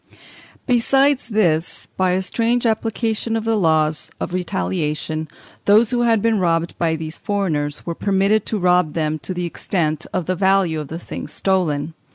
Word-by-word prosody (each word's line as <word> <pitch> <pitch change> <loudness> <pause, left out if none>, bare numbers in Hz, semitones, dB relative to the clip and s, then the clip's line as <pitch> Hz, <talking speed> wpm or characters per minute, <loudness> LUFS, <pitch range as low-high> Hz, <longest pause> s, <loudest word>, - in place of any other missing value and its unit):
Besides 270 +3 +2
this, 175 -7 0
by 185 -1 +2
a 190 +1 0
strange 235 +5 0
application 225 0 0
of 225 - -3
the 225 0 +1
laws 160 -5 +1
of - - -4
retaliation, 155 - -2 0.4
those 215 +3 +5
who 245 -1 +1
had 225 -3 +2
been 225 -2 +2
robbed 170 -1 0
by 165 -2 +1
these 160 0 -6
foreigners 160 -8 -2
were 170 - -2
permitted 200 +3 +1
to 220 - -1
rob 180 -4 +2
them 155 -1 -1
to 170 - -5
the 180 -1 -2
extent 160 -3 -2
of 185 -3 -2
the 185 - 0
value 190 -3 +2
of 150 - -5
the 160 - -6
things 170 - -7
stolen. 165 -5 0
185 Hz, 170 wpm, -20 LUFS, 160-215 Hz, 0.4 s, those